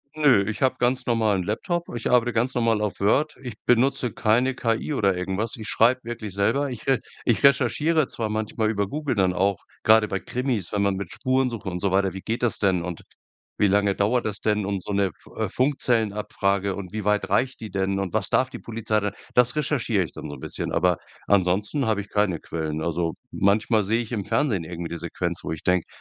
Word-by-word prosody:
Ne, 145 -10 +4
ich 105 - -5
habe 130 -1 +3
ganz 125 +1 +1
normal 110 -4 +2
'n 90 - -2
Laptop. 165 - -2
Ich 115 - -2
arbeite 120 -1 +3
ganz 120 +3 0
normal 115 -3 +2
auf 105 -2 -2
Word. 135 +10 +2
Ich 125 -5 -7
benutze 125 0 +2
keine 120 +5 +2
KI 115 +5 -1
oder 100 -8 +2
irgendwas. 95 +5 -2
Ich 110 -1 -7
schreibe 125 +3 +3
wirklich 115 -4 -5
selber. 135 +9 +1
Ich 120 -3 -8
re 135 -3 +3 0.3
ich 120 - +1
recherchiere 140 +3 +3
zwar 110 -2 -3
manchmal 110 0 -1
über 100 -2 0
Google 145 +2 -2
dann 95 -3 +2
auch, 95 +1 0 0.2
grade 110 0 +5
bei 95 - -2
Krimis, 125 -7 -2
wenn 105 - 0
man 100 -1 +1
mit 95 -2 -5
Spurensuche 130 -6 -1
und 90 0 -4
so 100 - +1
weiter 95 0 +2
wie 95 - -7
geht 115 +4 -2
das 120 - +3
denn 95 -4 +2
und 90 -1 -5 0.6
wie 105 - +4
lange 100 0 +2
dauert 110 +5 +1
das 105 -2 -2
denn 105 -2 0
und 100 -1 -2
so - - -5
'ne 100 -1 +1
Fu - - -18
äh, - - -2
Funkzellenabfrage 105 -7 0
und 95 -3 -7
wie 110 -1 -3
weit 105 0 +1
reicht 125 +7 +1
die 110 - -6
denn 95 0 -1
und 95 -2 -3
was 105 -3 +2
darf 130 - +2
die - - -8
Polizei. 110 -2 -1
Da 105 -1 -2 0.2
das 125 0 +4
recherchiere 135 -9 +1
ich 85 - -7
dann - - -7
so - - -6
'n - - -13
bisschen, - - -2
aber 90 0 +2 0.3
ansonsten 100 +7 +2
habe 110 -2 +1
ich 100 - -12
keine 105 -5 +1
Quellen. 80 -1 -4
Also, 85 0 -1 0.2
manchmal 105 +2 +2
sehe 110 +4 +1
ich 115 - -8
im 110 -4 -2
Fernsehen 115 - 0
irgend 85 0 -6
'ne 85 - -3
Sequenz, 85 +1 -3
wo - - -4
ich 80 -1 -5
denke: 90 -2 +1
105 Hz, 220 wpm, -24 LUFS, 95-120 Hz, 0.6 s, grade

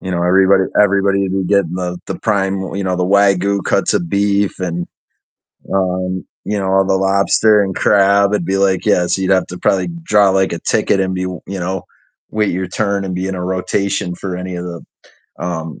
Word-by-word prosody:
You 95 - -6
know, 85 -1 -1
everybody 95 +2 +4 0.2
everybody 100 -1 +2
would 95 -1 -2
be 95 -1 -1
getting 100 -3 +1
the 90 -1 -3
the - - -5
prime 100 -3 0
w 95 0 -5
you 100 - -2
know, 90 -1 -1
the 90 - 0
Wagyu 100 0 +2
cuts - - +1
of 85 - -1
beef 100 +1 0
and 85 -1 -3 0.9
um, 95 -1 -1 0.2
you 105 0 -2
know, 95 -1 -2
all 95 0 +3
the 95 - +2
lobster 100 +2 +3
and 95 -1 -3
crab. 100 0 +3
It'd 100 -5 -1
be 95 +2 0
like, 95 -1 +1
yeah, 90 - +3
so 95 - -1
you'd 95 0 0
have 95 -1 +3
to 90 - -8
probably 95 +1 +1
draw, 105 -10 +4
like, 95 0 +1
a - - -5
ticket 100 - +1
and 95 -1 -1
be 90 0 -2
w 90 -1 -5
you 95 0 -5
know, 95 +1 -3 0.5
wait 105 -1 0
your 95 +1 -3
turn 100 0 -1
and 95 -1 -4
be 90 +1 -3
in 95 - -3
a 90 -1 -4
rotation 95 0 -2
for 90 0 -5
any 90 0 -5
of 90 - -5
the, 85 -1 -7 0.6
um, 80 -3 -5
95 Hz, 220 wpm, -16 LUFS, 90-100 Hz, 0.9 s, everybody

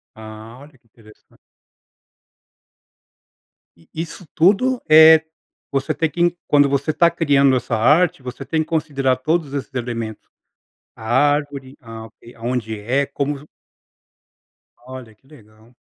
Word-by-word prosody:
Ah, 110 +2 -12
olha 145 -1 -17
que 120 - -43
interessante. 110 -1 -22 2.4
E 85 - -26
isso 165 +3 -7
tudo, 215 +9 +2
eh, 160 0 +7 0.5
você 135 0 -1
tem 160 -2 -1
que 175 +1 0
quando 145 -1 +3
você 140 +3 -1
está 170 +2 +3
criando 140 -5 +2
essa 125 -1 -2
arte, 150 +8 +2
você 130 +2 -8
tem 160 -1 -1
que 155 - -5
considerar 140 -5 -1
todos 155 +1 -2
esses 140 -1 -5
elementos. 115 -3 -6 0.7
A 110 - -14
árvore, 145 +1 0
ah 115 -2 -10
ok, 115 +2 -18
aonde 115 -2 -4
é, 130 +7 -1
como 140 +1 -3
vo 150 +2 -16 1.4
Olha 130 -3 -10
que 130 - -32
legal. 110 -4 -20
135 Hz, 130 wpm, -19 LUFS, 115-155 Hz, 2.4 s, eh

